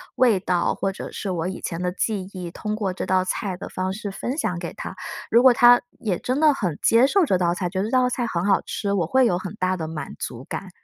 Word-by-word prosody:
味 235 Hz, -7 st, +4 dB
道， 180 Hz, -2 st, 0 dB
或 195 Hz, -, -1 dB
者 190 Hz, -, -8 dB
是 200 Hz, -, -5 dB
我 170 Hz, -1 st, -2 dB
以 185 Hz, -, -5 dB
前 170 Hz, 0 st, -4 dB
的 180 Hz, -, 0 dB
记 195 Hz, 0 st, -2 dB
忆， 180 Hz, -2 st, -6 dB
通 210 Hz, +3 st, -4 dB
过 200 Hz, -4 st, -2 dB
这 185 Hz, -, -4 dB
道 185 Hz, 0 st, +2 dB
菜 190 Hz, -1 st, -2 dB
的 -, -, -7 dB
方 185 Hz, 0 st, -2 dB
式 205 Hz, 0 st, -5 dB
分 250 Hz, +8 st, -4 dB
享 205 Hz, -, -1 dB
给 170 Hz, -, -6 dB
他。 -, -, -7 dB, 0.3 s
如 235 Hz, +2 st, +5 dB
果 255 Hz, -2 st, +8 dB
他 245 Hz, +1 st, +7 dB, 0.2 s
也 195 Hz, -6 st, -1 dB
真 255 Hz, +3 st, -1 dB
的 305 Hz, -2 st, +5 dB
很 180 Hz, -, -2 dB
接 230 Hz, +3 st, +5 dB
受 390 Hz, +4 st, +3 dB
这 190 Hz, -10 st, +2 dB
道 175 Hz, -1 st, +1 dB
菜， 180 Hz, -1 st, -2 dB
觉 185 Hz, +1 st, -3 dB
得 195 Hz, -, 0 dB
这 -, -, -8 dB
道 255 Hz, -1 st, +3 dB
菜 245 Hz, -1 st, -1 dB
很 175 Hz, -2 st, -2 dB
好 200 Hz, -1 st, +3 dB
吃， 200 Hz, -2 st, -3 dB
我 180 Hz, -5 st, +1 dB
会 260 Hz, +9 st, +3 dB
有 180 Hz, -6 st, +2 dB
很 185 Hz, +2 st, -6 dB
大 185 Hz, -1 st, 0 dB
的 160 Hz, -1 st, -4 dB
满 160 Hz, -1 st, -6 dB
足 120 Hz, +2 st, -6 dB
感。 195 Hz, -, -6 dB
190 Hz, 290 characters per minute, -23 LUFS, 180-230 Hz, 0.3 s, 果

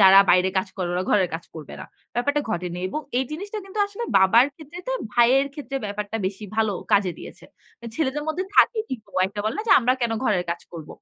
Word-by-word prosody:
যারা 195 Hz, 0 st, +9 dB
বাইরে 180 Hz, +1 st, +4 dB
কাজ 190 Hz, -, -2 dB
করে 185 Hz, -3 st, -2 dB
ওরা 180 Hz, -, 0 dB
ঘরের 190 Hz, -4 st, +3 dB
কাজ 165 Hz, -, -5 dB
করবে 155 Hz, -3 st, -9 dB
না। -, -, -8 dB, 0.3 s
ব্যাপারটা 285 Hz, +5 st, +1 dB
ঘটেনি। 175 Hz, -2 st, -3 dB
এবং 305 Hz, -, -3 dB, 0.2 s
এই 260 Hz, -, +1 dB
জিনিসটা 400 Hz, +7 st, -5 dB
কিন্তু 390 Hz, +2 st, -8 dB
আসলে 405 Hz, +4 st, -6 dB
বাবার 210 Hz, +7 st, +6 dB
ক্ষেত্রে 310 Hz, +3 st, -11 dB
তা -, -, 0 dB, 0.2 s
ভাইয়ের 250 Hz, +3 st, +4 dB
ক্ষেত্রে 275 Hz, -2 st, -5 dB
ব্যাপারটা 205 Hz, +1 st, -4 dB
বেশি 195 Hz, +2 st, -5 dB
ভালো 220 Hz, -2 st, +2 dB, 0.2 s
কাজে 200 Hz, -2 st, +4 dB
দিয়েছে। -, -, -11 dB, 0.5 s
ছেলেদের 295 Hz, -2 st, -1 dB
মধ্যে 355 Hz, +4 st, -1 dB
থাকে 455 Hz, -, +5 dB
কিন্তু 240 Hz, -5 st, -6 dB, 0.2 s
একটা 200 Hz, +2 st, -6 dB
বলে 215 Hz, -, -1 dB
না -, -, -1 dB
যে, -, -, +7 dB
আমরা 250 Hz, +1 st, +3 dB
কেন 235 Hz, -1 st, +1 dB
ঘরের 185 Hz, -6 st, +1 dB
কাজ 170 Hz, -, -3 dB
করব? 160 Hz, -3 st, -8 dB
220 Hz, 215 wpm, -24 LUFS, 190-290 Hz, 0.5 s, যারা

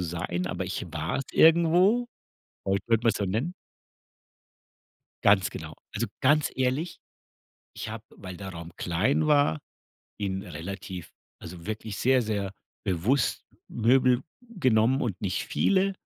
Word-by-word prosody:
sein, 85 Hz, +1 st, -2 dB
aber 95 Hz, -, -3 dB
ich 90 Hz, 0 st, -4 dB
war's 80 Hz, +11 st, -2 dB
irgendwo. 175 Hz, +8 st, +5 dB, 0.6 s
Vielleicht 95 Hz, 0 st, 0 dB
würde 115 Hz, 0 st, +2 dB
man's 115 Hz, -2 st, +3 dB
so 100 Hz, -, -1 dB
nennen. 115 Hz, -, -1 dB, 1.7 s
Ganz 100 Hz, -2 st, +5 dB
genau. -, -, -8 dB, 0.2 s
Also, -, -, 0 dB
ganz 145 Hz, +2 st, +3 dB
ehrlich, 130 Hz, +6 st, -1 dB, 0.8 s
ich -, -, -5 dB
habe, -, -, -7 dB
weil 90 Hz, -1 st, -9 dB
der 95 Hz, +2 st, -7 dB
Raum 85 Hz, -1 st, -8 dB
klein 100 Hz, -, +1 dB
war, 145 Hz, -, +4 dB, 0.6 s
ihn 95 Hz, -2 st, -2 dB
relativ 95 Hz, -1 st, -7 dB, 0.3 s
also, 85 Hz, -2 st, -10 dB
wirklich 110 Hz, -1 st, -5 dB
sehr, 130 Hz, 0 st, +4 dB
sehr 100 Hz, -3 st, -2 dB, 0.3 s
bewusst 105 Hz, +9 st, +1 dB, 0.2 s
Möbel 125 Hz, +2 st, +3 dB, 0.2 s
genommen 130 Hz, -, +2 dB
und 100 Hz, -6 st, -2 dB
nicht 95 Hz, -1 st, -1 dB
viele 195 Hz, 0 st, +2 dB
110 Hz, 125 wpm, -27 LUFS, 95-135 Hz, 1.7 s, irgendwo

